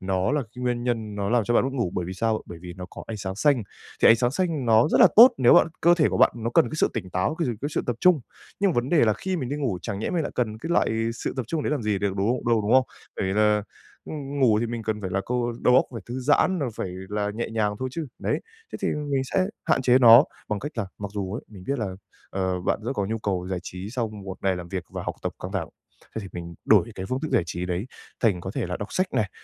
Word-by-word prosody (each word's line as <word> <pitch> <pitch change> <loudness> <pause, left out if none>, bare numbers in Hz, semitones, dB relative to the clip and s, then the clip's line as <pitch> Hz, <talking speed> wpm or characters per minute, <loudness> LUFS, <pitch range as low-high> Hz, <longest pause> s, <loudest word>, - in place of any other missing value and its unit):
nó 95 +4 0
là 150 -1 +1
cái 125 +2 -11
nguyên 120 -1 -1
nhân 115 -4 -2
nó 100 -1 -2
làm 120 -2 +3
cho 120 - 0
bạn - - +4
mất 135 - -2
ngủ, 120 -9 -1
bởi 90 - -1
vì 90 - -5
sao? 110 +3 -1
Bởi 85 - -9
vì 90 -1 -7
nó 90 -1 -7
có - - -9
ánh 110 - -5
sáng 95 -2 -4
xanh, 140 0 +3 0.4
thì - - +8
ánh 115 - +8
sáng 120 +1 +1
xanh 155 -3 -1
nó 115 +3 +5
rất - - +3
là - - +9
tốt 240 +4 +10
nếu 120 -2 +6
bạn - - +6
cơ 170 +1 +6
thể 160 -4 +3
của - - -1
bạn - - +6
nó 115 0 -3
cần - - +5
cái 155 - -6
sự - - +3
tỉnh 95 -5 -4
táo, 90 +12 0
cái 165 -1 -1
sự 120 - -1
cái 145 - -2
sự - - 0
tập 120 - -1
trung. 180 -5 +5 0.4
Nhưng 200 -1 +3
mà - - -2
vấn 120 +2 0
đề 160 -4 +4
là 110 - +3
khi 185 - -3
mình 130 -7 -3
đi 145 - -2
ngủ, 125 -11 -1
chẳng 100 -3 -4
nhẽ 110 - -2
mình 170 -2 0
lại - - -4
cần 110 -3 -1
cái 165 +8 -6
loại 170 - +2 0.2
sự - - -4
tập 130 - -1
trung 155 +4 -2
đấy - - -1
làm 150 -5 -1
gì 105 -2 0
để 100 - 0
đúng 95 - -5
không 125 -1 -2
đâu, 115 -2 +3
đúng 105 +3 0
không? 130 0 +6 0.3
Bởi - - -1
vì 95 - -1
là 105 0 +3 0.5
ng 145 -2 -5
ngủ 115 -5 +4
thì 120 - 0
mình 115 0 -4
cần 110 -1 -2
phải 95 -2 -4
là 95 +2 0
câu 120 -1 -1
đầu 125 - +5
óc 130 - +6
phải 115 - -5
thư 125 +2 -5
giãn 150 +7 +3
rồi 140 -6 -1
phải - - -3 0.2
là 105 0 -1
nhẹ 115 - -3
nhàng 105 -2 0
thôi 130 - -2
chứ. 160 +2 -4
Đấy, - - -1 0.3
thế - - -5
thì - - +1
mình 145 -3 -1
sẽ 185 +8 +1 0.2
hạn - - +2
chế 125 0 +5
nó 120 +1 +9 0.2
bằng 105 - -1
cách 145 - -5
là 105 - -1
mặc 105 -1 -5
dù 100 -2 -3
ấy, 115 - -5
mình 95 -4 -12
biết 140 0 -1
là, 110 - -1 0.4
ờ, 95 -1 -1
bạn 90 - 0
rất 120 - -2
có 100 - -1
nhu 110 +2 -2
cầu 95 -4 -2
giải 95 -1 -2
trí 90 +3 -7
sau 120 -2 -2
một 100 -3 -8
ngày 95 -1 +1
làm 90 -1 -7
việc 95 -1 -4
và - - -5
học - - -4
tập - - -2
căng - - -5
thẳng, - - -2 0.5
thế 110 - -3
thì 100 - -8
mình 85 -1 -7
đổi 115 - +4
cái 95 - -5
phương 130 +5 -2
thức 155 - -3
giải - - +4
trí 85 +2 -4
đấy 90 +4 -2 0.3
thành 100 -7 +2
có 95 - -5
thể - - -1
là 90 +1 -3
đọc 100 - -7
sách 185 - +1
này, 105 -4 0
115 Hz, 305 wpm, -25 LUFS, 100-130 Hz, 0.5 s, tốt